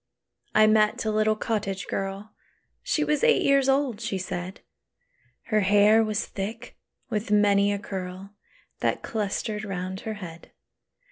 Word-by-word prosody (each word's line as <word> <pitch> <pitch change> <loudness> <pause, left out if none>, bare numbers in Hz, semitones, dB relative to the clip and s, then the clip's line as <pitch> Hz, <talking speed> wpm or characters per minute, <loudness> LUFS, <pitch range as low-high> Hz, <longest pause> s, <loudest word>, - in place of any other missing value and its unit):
I 215 - +7
met 215 0 +3
a 215 - +1
little 215 0 +2
cottage 205 -3 -2
girl: 195 +2 -4 0.5
She - - 0
was 300 +4 0
eight 475 -1 +4
years 275 -1 +3
old, 270 -5 +1
she 220 -4 -2
said; 185 0 -5 0.8
Her 215 -2 +1
hair 205 +2 +5
was 215 0 -1
thick 200 +3 -6 0.4
with 215 -1 -2
many 205 -1 +4
a 205 - 0
curl 190 0 -7 0.5
That - - -1
clustered 210 0 -3
round 190 -2 -4
her 220 +1 -5
head. 170 -5 -10
210 Hz, 140 wpm, -26 LUFS, 195-220 Hz, 0.8 s, I